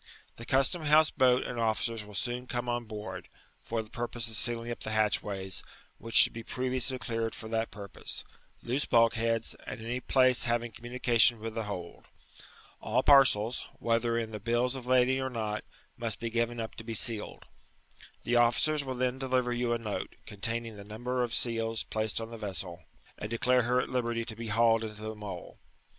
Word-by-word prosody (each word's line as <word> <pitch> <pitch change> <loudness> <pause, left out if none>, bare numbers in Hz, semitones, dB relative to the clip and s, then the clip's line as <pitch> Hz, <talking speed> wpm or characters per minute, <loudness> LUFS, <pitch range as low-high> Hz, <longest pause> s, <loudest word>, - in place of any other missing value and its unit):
The 115 - -9
custom 135 +5 +3
house 155 +1 +5
boat 130 -1 +4
and 120 - -4
officers 115 0 0
will 105 0 -12
soon 125 +3 -2
come 120 0 -3
on 120 0 -1
board, 105 -4 -7 0.3
for 115 -1 -3
the 110 - -15
purpose 120 -1 -2
of - - -2
sealing 120 +1 +1
up 120 - -5
the - - -4
hatchways, 100 -3 0 0.4
which 115 0 -7
should - - +9
be 115 - -6
previouslv 130 +1 -1
cleared 115 -1 -2
for 110 - -8
that 115 0 -1
purpose; 100 -2 -5 0.4
loose 130 +4 0
bulk 115 -1 +4
heacb, 115 0 0 0.2
and - - -5
any 120 +3 -3
place 130 -1 +3
havinff 120 -1 0
communication 120 0 +3
with 110 0 -5
the 115 -1 -3
hold. 90 -4 -7 0.8
All 120 +4 +1
parceb, 125 -5 +5 0.2
whether 115 0 +1
in 115 -1 -2
the 105 - -5
biUs 120 +4 +1
of 125 -2 -7
lading 130 +1 +4
or 130 - -1
not, 110 -3 -3 0.3
must 115 -3 -3
be 115 0 -3
given 120 +1 0
up 110 -1 -4
to 110 - -7
be 115 0 -4
sealed. 110 -2 -1 0.8
The 120 +1 +2
officers 130 +6 +3
will 130 -1 -4
then 125 +1 -1
deliver 130 -2 +1
you 120 0 0
a 120 - +2
note, 110 -3 -5
containing 115 +1 -3
the 100 - -9
numtor 120 +5 -3
of 120 - -3
seals 115 -1 0
placed 110 0 -1
on 115 0 -6
the 115 - -8
vessel, 90 -5 -4 0.3
and 105 - -4
declare 125 +2 +3
her 125 +1 +2
at - - -5
liberty 120 -2 -1
to 115 -2 -6
be 115 +1 -6
hauled 115 +1 +3
into 110 -1 -6
the 110 0 -4
Mole. 105 -5 -8
115 Hz, 190 wpm, -30 LUFS, 110-125 Hz, 0.8 s, should